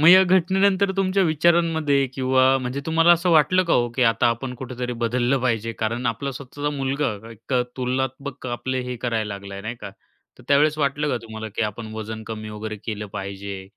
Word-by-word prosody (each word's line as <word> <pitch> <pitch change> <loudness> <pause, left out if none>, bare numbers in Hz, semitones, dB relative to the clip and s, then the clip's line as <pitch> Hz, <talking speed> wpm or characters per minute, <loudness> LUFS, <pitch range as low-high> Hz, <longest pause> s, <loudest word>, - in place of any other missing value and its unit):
मग 155 - +7
या 185 +1 +9
घटनेनंतर 190 +2 +3
तुमच्या 195 0 +2
विचारांमध्ये 160 -4 +2
किंवा 130 0 +2 0.2
म्हणजे 130 +2 -3
तुम्हाला 165 +1 +5
असं 175 +1 +2
वाटलं 170 +4 +5
का 170 - 0
हो, 120 -1 +2
की 125 +2 -1
आता 115 0 +3
आपण 125 +2 -2
कुठेतरी 125 -1 -5
बदललं 120 +3 0
पाहिजे. 115 -2 0
कारण 115 +3 -2
आपला 125 +5 -2
स्वतःचा 140 +2 -5
मुलगा, 135 -2 0 0.2
एक 115 +4 -10 0.2
तुलनात्मक 130 +1 -3
आपले 130 +2 -2
हे 125 - -3
करायला 110 -4 -2
लागला 100 0 -8
नाही 110 +4 -5
का. 100 - -7 0.5
तर - - -14
त्यावेळेस 150 +2 +4
वाटलं 145 +1 0
का 125 - 0
तुम्हाला, 110 -1 -7
की 110 +2 -3
आपण 110 +1 -4
वजन 110 0 -6
कमी 110 -1 -6
वगैरे 110 0 -5
केलं 105 -2 -4
पाहिजे 100 0 -6
125 Hz, 185 wpm, -23 LUFS, 110-150 Hz, 0.5 s, या